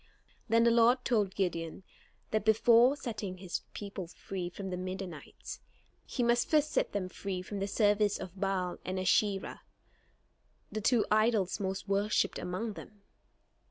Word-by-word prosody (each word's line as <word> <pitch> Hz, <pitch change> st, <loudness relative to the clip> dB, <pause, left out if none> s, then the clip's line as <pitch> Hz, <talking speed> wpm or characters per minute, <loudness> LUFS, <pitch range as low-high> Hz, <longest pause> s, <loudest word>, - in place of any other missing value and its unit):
Then 230 Hz, +1 st, +5 dB
the 235 Hz, -, +5 dB
Lord 240 Hz, +2 st, +4 dB
told 210 Hz, -6 st, +1 dB
Gideon 170 Hz, -2 st, -2 dB, 0.5 s
that 215 Hz, -1 st, +1 dB
before 230 Hz, +4 st, +5 dB
setting 210 Hz, -9 st, -5 dB
his 185 Hz, -1 st, -4 dB
people 200 Hz, -3 st, -6 dB
free 180 Hz, +1 st, -5 dB
from 190 Hz, +1 st, -6 dB
the -, -, -1 dB
Midianites, 185 Hz, -3 st, -6 dB, 0.5 s
he 250 Hz, -, -1 dB
must 240 Hz, 0 st, +2 dB
first 305 Hz, -1 st, +3 dB
set -, -, +1 dB
them 200 Hz, -3 st, -2 dB
free 185 Hz, 0 st, -5 dB
from 200 Hz, +2 st, -5 dB
the 195 Hz, -, -1 dB
service 205 Hz, 0 st, +2 dB
of 185 Hz, +1 st, -8 dB
Baal 185 Hz, -2 st, -1 dB
and 185 Hz, 0 st, -3 dB
Asherah, 195 Hz, +1 st, +1 dB, 1.1 s
the 215 Hz, -, -3 dB
two 235 Hz, +1 st, +3 dB
idols 215 Hz, -3 st, +2 dB
most 190 Hz, 0 st, -3 dB
worshipped 200 Hz, 0 st, +1 dB
among 205 Hz, +5 st, -3 dB
them. 205 Hz, 0 st, -12 dB
200 Hz, 150 wpm, -31 LUFS, 185-220 Hz, 1.1 s, Then